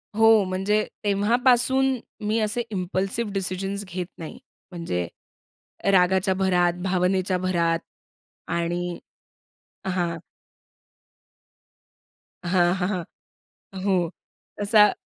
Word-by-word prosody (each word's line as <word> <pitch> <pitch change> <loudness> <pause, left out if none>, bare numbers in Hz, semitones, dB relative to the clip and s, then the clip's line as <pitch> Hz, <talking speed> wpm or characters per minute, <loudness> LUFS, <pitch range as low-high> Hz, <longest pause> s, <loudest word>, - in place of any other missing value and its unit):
हो. 225 -2 +6
म्हणजे 195 +3 +1 0.2
तेव्हापासून 245 +6 +3 0.3
मी 220 +2 +1
असे 215 +3 0
इम्पल्सिव्ह 195 +3 -2
डिसिजन्स 195 +1 -2
घेत 180 -1 -4
नाही. 170 +9 -8 0.3
म्हणजे 90 - -3 0.8
रागाच्या 190 +1 +3
भरात, 180 -2 +2
भावनेच्या 185 0 +1
भरात 170 -2 +1 0.7
आणि 175 +1 -2 0.9
हां 175 -3 -1 2.2
हां, 175 0 +3
हां, 180 -1 -1
हां, 180 -5 -6 0.6
हो 180 -4 +1 0.5
तसा 210 0 +5
190 Hz, 85 wpm, -24 LUFS, 175-210 Hz, 2.2 s, हो